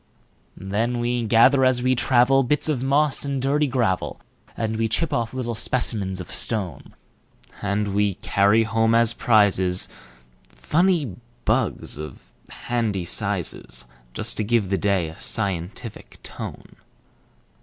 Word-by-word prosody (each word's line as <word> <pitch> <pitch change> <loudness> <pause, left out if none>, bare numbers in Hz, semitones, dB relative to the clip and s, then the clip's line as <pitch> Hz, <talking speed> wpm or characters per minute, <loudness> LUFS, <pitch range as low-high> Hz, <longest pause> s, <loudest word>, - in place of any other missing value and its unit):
Then 110 +6 -1
we 120 0 -1
gather 120 +5 +5
as 130 -1 +3
we 130 0 +3
travel, 130 +2 +4
Bits 140 +4 0
of 145 -6 0
moss 140 +2 +1
and 140 -1 -2
dirty 145 +3 +1
gravel, 120 -8 -1 0.4
And 110 -1 -2
we 115 0 +1
chip 140 +8 -1
off 115 -2 -1
little 125 -2 -3
specimens 105 -5 -2
of 90 - -7
stone; 95 - -2 0.7
And 100 0 -1
we 100 -1 +1
carry 100 +4 +3
home 115 +1 +2
as 115 0 +4
prizesFunny 95 - 0 0.3
bugs, 110 - 0
of 75 -5 -9 0.2
handy 110 -7 -2
sizes, 85 - -2 0.3
Just 110 +2 -3
to 110 - 0
give 105 -3 +1
the 95 - +2
day 95 -3 +1
a 80 - -11
scientific 100 +2 -4
tone. - - -9
110 Hz, 130 wpm, -23 LUFS, 95-125 Hz, 0.7 s, gather